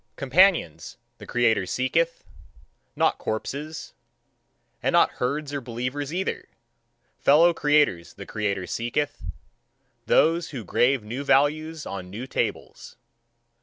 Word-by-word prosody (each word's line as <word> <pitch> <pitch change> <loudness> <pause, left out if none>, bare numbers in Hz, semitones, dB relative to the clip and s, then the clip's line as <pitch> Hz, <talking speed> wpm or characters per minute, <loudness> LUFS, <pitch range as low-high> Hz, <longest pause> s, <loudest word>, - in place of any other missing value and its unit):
Companions, 155 - +2 0.2
the - - -11
creator 115 -6 +1
seeketh, 165 - 0 0.7
not - - +1
corpses 145 +8 -5 0.9
and - - 0
not - - +5
herds 145 +3 -2
or 140 - -3
believers 125 +4 -4
either. 185 +3 -3 0.7
Fellow 165 +5 +5
creators 145 - +1
the - - -9
creator 100 -3 -2
seeketh 130 +8 -3 0.9
those 165 +1 +3
who 130 -6 -6
grave 125 +6 +1
new 120 +6 -5
values 155 +3 +1
on 95 -2 -6
new 110 +7 -6
tables. - - -4
140 Hz, 110 wpm, -25 LUFS, 115-155 Hz, 0.9 s, not